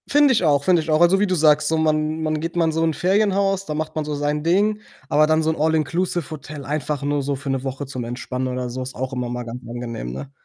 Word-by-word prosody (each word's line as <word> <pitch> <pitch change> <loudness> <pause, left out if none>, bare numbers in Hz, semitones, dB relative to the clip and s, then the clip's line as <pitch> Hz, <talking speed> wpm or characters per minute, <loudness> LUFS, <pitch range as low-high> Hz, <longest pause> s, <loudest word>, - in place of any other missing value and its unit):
Finde 290 -1 +5
ich 220 - +1
auch, 145 -3 +3
finde 175 +1 +4
ich 155 - -8
auch. 155 0 +3
Also, 175 +3 +5
wie 205 - +2
du 185 - +1
sagst, 150 -2 +4
so 160 - +1
man 155 0 +1
man 155 -1 0
geht 165 +2 -4
mal 170 -1 +3
in 160 - +1
so 160 +1 0
'n 165 -1 +2
Ferienhaus, 195 +1 +1
da 150 - -4
macht 155 +1 -4
man 155 - -1
so 150 0 -3
sein 145 +1 -1
Ding, 205 +5 +2 0.3
aber 155 -1 +4
dann 155 0 +2
so 160 - +2
'n - - -3
All-inclusive-Hotel 155 -1 -1
einfach 150 0 -2
nur 145 0 0
so 140 +1 -1
für 135 0 -4
'ne 135 -1 -2
Woche 135 +1 -4
zum 130 -2 -5
Entspannen 125 +2 -4
oder 125 -1 -3
so, 130 +2 -5
ist 130 +1 -6
auch 130 +1 -4
immer 125 -1 -3
mal 125 0 -4
ganz 120 +2 -7
angenehm, 115 - -5
ne? 100 - -7
155 Hz, 270 wpm, -22 LUFS, 135-165 Hz, 0.3 s, Finde